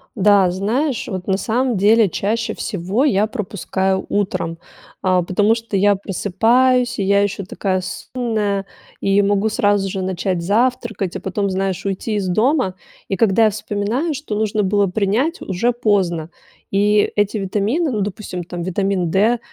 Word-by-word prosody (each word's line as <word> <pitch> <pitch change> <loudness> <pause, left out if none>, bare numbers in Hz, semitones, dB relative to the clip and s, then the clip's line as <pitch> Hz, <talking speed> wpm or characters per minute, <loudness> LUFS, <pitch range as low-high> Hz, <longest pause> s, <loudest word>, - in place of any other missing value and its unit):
Да, 200 -3 +4
знаешь, 230 - -1
вот 185 -1 -5
на 190 -1 +1
самом 245 +3 0
деле, 210 +2 +4
чаще 220 +6 -2
всего 200 +5 -2
я 210 -7 +3
пропускаю 190 -2 -2
утром, 185 -5 -1 0.4
а, 185 -2 +2
потому 205 +5 +2
что 225 -3 -5
я 200 +1 +4
просыпаюсь 230 +7 +1
и - - +1
я 200 +1 +3
еще 200 -1 -2
такая 185 -1 -2
сонная 205 0 -3 0.3
и 195 +1 +2
могу 205 +2 +1
сразу 205 -3 +1
же 190 0 -3
начать 185 -1 -2
завтракать, 220 -2 0
а - - -3
потом, 200 +1 -2
знаешь, 190 -1 -2
уйти 200 +3 -2
из 195 -2 -1
дома. 220 - +1 0.3
И 195 - -1
когда 225 +1 +3
я - - +5
вспоминаю, 215 +9 -2
что 275 -6 -5
нужно 215 0 0
было 200 +1 +2
принять, 220 - 0
уже 200 +6 0
поздно 190 -8 0 0.4
и 205 +1 +2
эти 205 +1 +1
витамины, 210 - 0
ну 210 -3 -1
допустим, 190 -3 -4
там, 175 0 -6
витамин 185 -1 -1
D, 220 +7 +2
205 Hz, 155 wpm, -19 LUFS, 190-220 Hz, 0.4 s, я